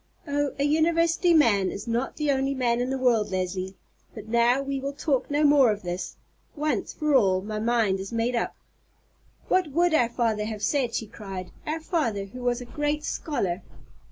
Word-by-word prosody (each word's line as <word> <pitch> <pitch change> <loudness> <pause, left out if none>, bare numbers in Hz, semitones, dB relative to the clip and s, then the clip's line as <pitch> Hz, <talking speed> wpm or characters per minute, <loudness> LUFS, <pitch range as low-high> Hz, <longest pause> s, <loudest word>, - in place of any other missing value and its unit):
Oh, 290 0 -1
a 280 - 0
university 330 +3 +3
man 220 - +4
is 200 - -7
not 235 +3 -1
the 300 -2 +1
only 270 0 0
man 240 -2 +1
in 250 - -1
the 265 - -1
world, 235 -5 +2
Leslie. 185 0 -3 0.4
But 215 -1 -9
now 235 +3 +3
we 275 0 -2
will 275 +1 -4
talk 280 -2 -1
no 290 +1 +1
more 285 -4 +6
of 210 -2 -2
this. 175 +1 -4 0.4
Once 305 0 -1
for 305 -2 -1
all, 190 -8 +4
my 215 +1 -4
mind 220 -4 +1
is 195 0 -6
made 230 +2 0
up." 235 - -1 0.9
"What 370 -2 +2
would 340 +4 +2
our 245 -7 +3
father 225 -3 0
have 215 -1 -5
said," 260 -5 +1
she 225 - -2
cried; 195 -3 -8 0.2
"our 310 +2 -1
father, 235 - -1
who 250 +6 -10
was 245 0 0
a - - -7
great 295 +3 -2
scholar?" 195 - -2
245 Hz, 190 wpm, -26 LUFS, 215-290 Hz, 0.9 s, more